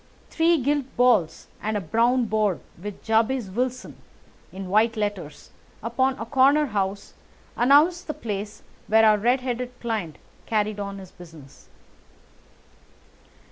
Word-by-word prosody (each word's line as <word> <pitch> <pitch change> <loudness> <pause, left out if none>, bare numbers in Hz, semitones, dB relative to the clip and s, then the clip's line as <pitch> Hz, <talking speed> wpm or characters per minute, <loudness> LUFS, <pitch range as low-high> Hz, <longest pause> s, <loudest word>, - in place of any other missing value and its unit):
Three 330 +1 +3
gilt 285 0 0
balls 215 -10 +2 0.2
and 215 0 -1
a - - -1
brown 235 +7 +1
board 215 -4 0 0.2
with 205 0 -8
"JABEZ 225 -1 +1
WILSON" 250 +4 -3 0.5
in 190 0 -7
white 225 +3 +3
letters, 205 -8 -4 0.3
upon 260 +3 0
a 225 - -5
corner 280 +4 +4
house, 200 -4 -3 0.4
announced 300 +8 +4
the 305 - -4
place 205 -1 -6 0.2
where 220 +1 +5
our 215 -1 +5
red 245 +5 +2
headed 250 0 -4
client 215 -10 -4 0.3
carried 215 -1 -1
on 200 -1 -5
his 190 -2 -11
business. 160 -6 -15
220 Hz, 130 wpm, -24 LUFS, 200-255 Hz, 0.5 s, where